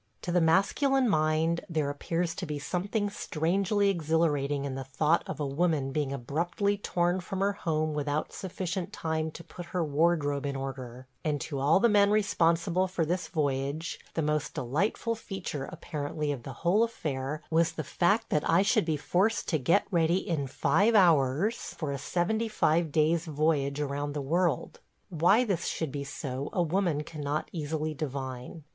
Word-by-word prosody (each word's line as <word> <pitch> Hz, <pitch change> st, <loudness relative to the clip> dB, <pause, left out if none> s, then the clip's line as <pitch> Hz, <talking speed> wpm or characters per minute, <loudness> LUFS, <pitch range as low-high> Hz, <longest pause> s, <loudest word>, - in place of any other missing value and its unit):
To 175 Hz, -, -2 dB
the 175 Hz, 0 st, +3 dB
masculine 250 Hz, -, +3 dB
mind 160 Hz, -2 st, +2 dB
there 155 Hz, -4 st, 0 dB
appears 165 Hz, +4 st, -2 dB
to 180 Hz, -, -5 dB
be 150 Hz, -1 st, -3 dB
something 195 Hz, +8 st, -1 dB
strangely 195 Hz, +4 st, +1 dB
exhilarating 150 Hz, -4 st, 0 dB
in 135 Hz, -, -3 dB
the 135 Hz, 0 st, -4 dB
thought 150 Hz, +6 st, +2 dB
of -, -, -5 dB
a 145 Hz, -, -1 dB
woman 145 Hz, -1 st, 0 dB
being 145 Hz, -1 st, -1 dB
abruptly 170 Hz, -, -1 dB
torn 175 Hz, -2 st, 0 dB
from 190 Hz, +1 st, -5 dB
her 200 Hz, +1 st, +2 dB
home 155 Hz, -5 st, -1 dB
without 150 Hz, 0 st, -2 dB
sufficient 185 Hz, 0 st, -4 dB
time 160 Hz, -3 st, -2 dB
to 170 Hz, -, -10 dB
put 175 Hz, +1 st, -10 dB
her 170 Hz, -, +1 dB
wardrobe 145 Hz, -2 st, +1 dB
in 140 Hz, -, -3 dB
order, 130 Hz, -2 st, -6 dB, 0.2 s
and 150 Hz, -2 st, 0 dB
to 140 Hz, -4 st, -4 dB
all 145 Hz, +7 st, +4 dB
the 235 Hz, -, +5 dB
men 205 Hz, -2 st, +5 dB
responsible 185 Hz, -3 st, +2 dB
for 180 Hz, -3 st, -1 dB
this 180 Hz, +3 st, -1 dB
voyage 145 Hz, +1 st, -2 dB, 0.2 s
the 160 Hz, -, 0 dB
most 150 Hz, -1 st, -1 dB
delightful 155 Hz, -, 0 dB
feature 195 Hz, -10 st, -5 dB
apparently 150 Hz, -1 st, -3 dB
of 140 Hz, -4 st, -4 dB
the 135 Hz, +3 st, -7 dB
whole 190 Hz, +6 st, +4 dB
affair 150 Hz, -, -3 dB
was 165 Hz, +1 st, +3 dB
the 155 Hz, -, -4 dB
fact 200 Hz, +10 st, +1 dB
that 150 Hz, -, 0 dB
I 170 Hz, +4 st, +5 dB
should 215 Hz, -1 st, +3 dB
be 160 Hz, -2 st, 0 dB
forced 195 Hz, +9 st, +1 dB
to 155 Hz, -, +1 dB
get 165 Hz, +10 st, +3 dB
ready 170 Hz, +1 st, +2 dB
in 150 Hz, -5 st, -1 dB
five 210 Hz, -, +2 dB
hours 170 Hz, -, +3 dB
for 155 Hz, -4 st, -2 dB
a 140 Hz, -, -3 dB
seventy 215 Hz, -, 0 dB
five 165 Hz, -6 st, +1 dB
days' 160 Hz, +3 st, +2 dB
voyage 150 Hz, -2 st, +1 dB
around 145 Hz, 0 st, -2 dB
the 150 Hz, -, -3 dB
world. 165 Hz, 0 st, 0 dB, 0.2 s
– -, -, -44 dB
Why 180 Hz, +7 st, +4 dB
this 195 Hz, -8 st, -1 dB
should 160 Hz, -4 st, -2 dB
be 140 Hz, 0 st, -4 dB
so 135 Hz, 0 st, -4 dB
a 175 Hz, -, +2 dB
woman 170 Hz, -3 st, 0 dB
cannot 150 Hz, -1 st, -3 dB
easily 155 Hz, -1 st, -2 dB
divine. 135 Hz, 0 st, -5 dB
160 Hz, 175 wpm, -29 LUFS, 145-180 Hz, 0.2 s, the